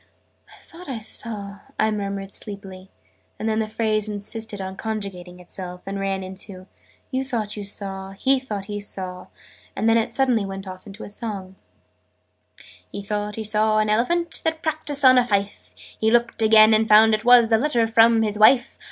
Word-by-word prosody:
"I - - -17
thought 335 -1 -13
I 255 - -3
saw 205 -2 -2
" - - -28
I 220 0 +2
murmured 200 -2 -4
sleepily: 195 -3 -7 0.5
and 220 - -4
then 220 0 0
the 220 - -1
phrase 215 -1 -1
insisted 210 +1 -3
on 190 0 -5
conjugating 195 -5 -6
itself, 180 0 -8
and 195 0 -4
ran 195 -1 -2
into 185 0 -9 0.5
"you 260 0 -1
thought 225 -6 -3
you 205 - -6
saw 195 -1 -5
he 265 +7 +1
thought 210 -7 -6
he 205 0 -5
saw 185 -2 -6 0.2
" - - -27
and 220 - -1
then 225 0 +5
it 225 - -2
suddenly 255 -5 +1
went 195 0 -7
off 185 +2 -10
into 205 +2 -10
a - - -8
song: 200 -4 -7 1.4
"He 200 - -6
thought 210 0 -3
he 220 - -4
saw 215 0 +1
an 215 0 +2
Elephant, 335 +11 +1
That 320 0 -2
practised 300 -3 -1
on 255 -1 +8
a 245 - +1
fife: 200 -2 -2
He 220 - -3
looked 235 0 +1
again, 220 0 +6
and 220 +1 +3
found 220 +1 +6
it 215 0 0
was 240 -1 +6
A 225 - +5
letter 245 -4 +1
from 225 0 +4
his 210 -1 -1
wife. 250 +4 +4
215 Hz, 190 wpm, -22 LUFS, 195-230 Hz, 1.4 s, on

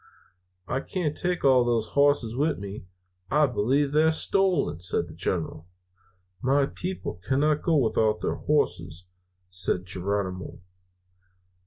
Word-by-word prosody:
"'I 130 - -1
can't 155 0 -3
take 180 -3 -1
all 130 -2 +6
those 115 -2 0
hosses 140 -5 +2
with 150 +4 +1
me; 100 -1 -8 0.4
I 150 +1 +4
believe 135 +3 +1
they're 155 +2 +4
stolen!' 180 - +1
says 90 - -1
the - - -12
General. 80 - -3 0.7
"'My 140 +2 +3
people 180 - -5
cannot 145 +6 +1
go 165 - +1
without 110 -4 +2
their - - -1
hosses,' 85 +3 -1 0.5
says 90 0 0
Geronimo. 95 0 -3
130 Hz, 125 wpm, -26 LUFS, 100-150 Hz, 0.7 s, all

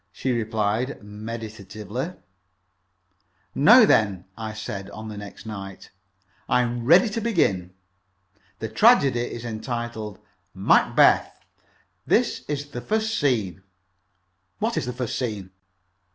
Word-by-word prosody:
she 130 - -2
replied, 110 +2 -1
meditatively. 110 - -6 1.4
"Now - - +7
then," 100 -4 +2
I 110 -1 -5
said, 100 -2 -6
on 110 +1 -8
the 105 - -7
next 105 +2 -10
night, 95 -3 -8 0.6
"I 125 - +3
am 120 0 -3
ready 175 - +6
to 225 +2 -3
begin. 95 - 0 0.8
The 110 - -4
tragedy 140 - +4
is 120 0 -4
entitled 115 -2 -5 0.4
'Macbeth.' - - +3 0.6
This - - +1
is 145 0 -4
the 120 - -5
first 220 - -1
scene." 110 -10 0 1.0
"What - - -1
is - - -2
the 125 - -3
first 125 -2 -3
scene?" 105 -7 -4
115 Hz, 115 wpm, -24 LUFS, 105-125 Hz, 1.4 s, Now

